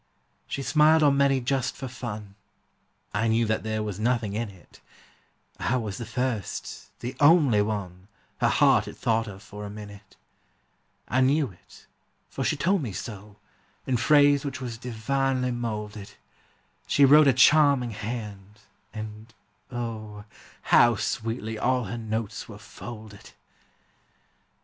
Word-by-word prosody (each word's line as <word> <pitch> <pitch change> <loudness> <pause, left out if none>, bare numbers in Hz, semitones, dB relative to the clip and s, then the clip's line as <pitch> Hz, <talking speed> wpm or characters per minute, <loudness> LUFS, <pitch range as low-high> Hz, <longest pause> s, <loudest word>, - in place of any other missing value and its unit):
She 135 - -4
smiled 155 +2 +4
on 145 -2 +5
many 140 -1 +3
just 130 +1 -1
for 135 - -6
fun, 110 -5 -7 0.8
I 110 +3 +1
knew 115 +1 +2
that 110 0 0
there 110 0 -2
was 105 -2 -5
nothing 115 -2 0
in 110 +1 -2
it; 95 -3 -18 0.8
I 125 - 0
was 110 -4 -4
the 115 - -6
first, 115 -3 -4
the 120 +2 -5
only 145 -8 +5
one, 95 -3 -4 0.3
Her - - +3
heart - - +4
had - - -9
thought 115 0 0
of 100 -1 -10
for 105 +1 -9
a 100 - -6
minute. 100 -1 -11 0.9
I 130 - +1
knew 140 -1 +2
it, 85 - -19 0.5
for - - -3
she 155 - 0
told 185 +4 +1
me 115 -8 -4
so, 105 +1 -8 0.5
In 130 - 0
phrase 145 +3 +4
which 140 -2 -4
was 120 -3 -6
divinely 125 +2 -1
moulded; 105 -4 -5 0.7
She 140 - +5
wrote 150 +2 +7
a - - +7
charming 140 -1 +5
hand, 105 -2 -7 0.3
and 110 +1 -8 0.4
O, 110 -4 -6 0.4
How 120 -1 +5
sweetly 110 +1 -3
all 125 +2 +1
her 110 +3 -5
notes 110 -1 -4
were 105 - -9
folded! 110 -1 -11
115 Hz, 140 wpm, -26 LUFS, 105-130 Hz, 0.9 s, wrote